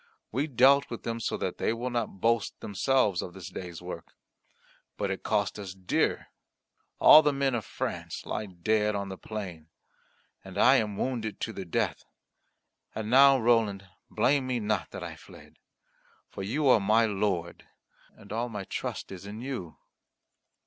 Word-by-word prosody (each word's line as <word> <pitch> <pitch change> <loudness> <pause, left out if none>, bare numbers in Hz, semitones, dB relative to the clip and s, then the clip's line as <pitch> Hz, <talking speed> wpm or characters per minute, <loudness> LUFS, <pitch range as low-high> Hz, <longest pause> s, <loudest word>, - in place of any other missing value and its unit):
We 135 +7 0
dealt 140 +1 +5
with 115 - -6
them 115 0 -3
so 115 - -2
that - - -4
they - - +1
will 120 +2 -4
not 120 -5 -3
boast 115 0 +1
themselves 105 -1 +1
of 90 - -8
this 95 - -8
day's 90 -2 -8
work. 85 -2 -8 0.8
But 100 -1 -1
it 95 - -4
cost 105 -1 0
us 95 -2 -7
dear; 95 -1 0 0.7
all 155 - +9
the 150 -1 +2
men 135 -1 0
of 115 -5 -2
France - - -5
lie 110 - -3
dead 105 +4 0
on 100 -1 -3
the 95 - -6
plain, 90 -8 -7 0.7
and 95 0 -10
I 130 +6 +6
am 105 -4 -1
wounded 110 -5 -2
to - - -3
the 95 - -6
death. 85 - -1 0.9
And 110 0 -4
now, 135 +1 +7
Roland, 110 -5 +1 0.2
blame 135 -1 +2
me 125 -2 0
not 105 -4 -1
that - - -7
I - - -6
fled; - - -16 0.7
for - - -7
you 135 +10 0
are 125 - +6
my 110 +3 +3
lord, 95 -5 -2 0.5
and 105 -1 -10
all 120 +2 -1
my 105 -3 -5
trust - - -5
is 95 +1 -8
in 105 +2 -7
you." 120 - -6
110 Hz, 170 wpm, -28 LUFS, 95-120 Hz, 0.9 s, all